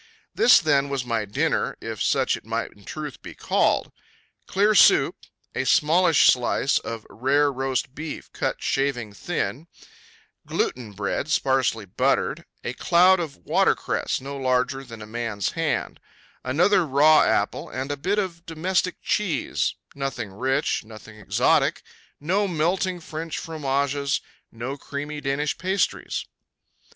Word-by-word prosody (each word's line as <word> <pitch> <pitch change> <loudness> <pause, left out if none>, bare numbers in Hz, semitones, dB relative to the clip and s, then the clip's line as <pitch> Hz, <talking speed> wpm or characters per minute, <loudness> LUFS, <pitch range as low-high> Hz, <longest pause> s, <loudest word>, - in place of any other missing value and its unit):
This, 245 - +6
then, 140 -3 +2
was 135 -3 -2
my 115 -3 -1
dinner, 100 - -1
if - - -6
such - - +2
it - - -10
might - - -3
in 100 -1 -20
truth 150 -4 -7
be - - -10
called: - - +1 0.6
Clear 205 +3 +3
soup, - - +6 0.4
a - - -1
smallish 165 0 +4
slice 125 +2 +3
of 115 -1 -7
rare 140 +4 +1
roast 130 -1 -2
beef 150 +1 -7
cut - - -2
shaving 125 -6 -1
thin, 160 +3 -3 0.8
gluten 115 -4 -2
bread 100 +9 -2
sparsely 130 -7 +1
buttered, 90 - 0 0.2
a - - -3
cloud 180 +2 +4
of 160 -5 -4
watercress - - +1
no 140 +2 -7
larger 130 +1 0
than 115 -4 -10
a - - -8
man's 110 -3 -3
hand, - - -2 0.4
another 175 +9 +3
raw 150 +1 +5
apple - - 0
and 130 +2 -4
a - - -1
bit 185 +9 -1
of 180 -5 -2
domestic 175 +3 0
cheese 185 -9 0 0.2
nothing 135 -7 -4
rich, 130 +7 0
nothing 110 0 -13
exotic, 100 - +2 0.4
no 190 +7 +1
melting 180 +2 0
French 160 0 -6
fromages, 140 -3 -1 0.3
no 125 +5 -5
creamy 145 +2 -6
Danish 145 +2 -1
pastries. 190 +2 -1
140 Hz, 135 wpm, -24 LUFS, 125-165 Hz, 0.8 s, This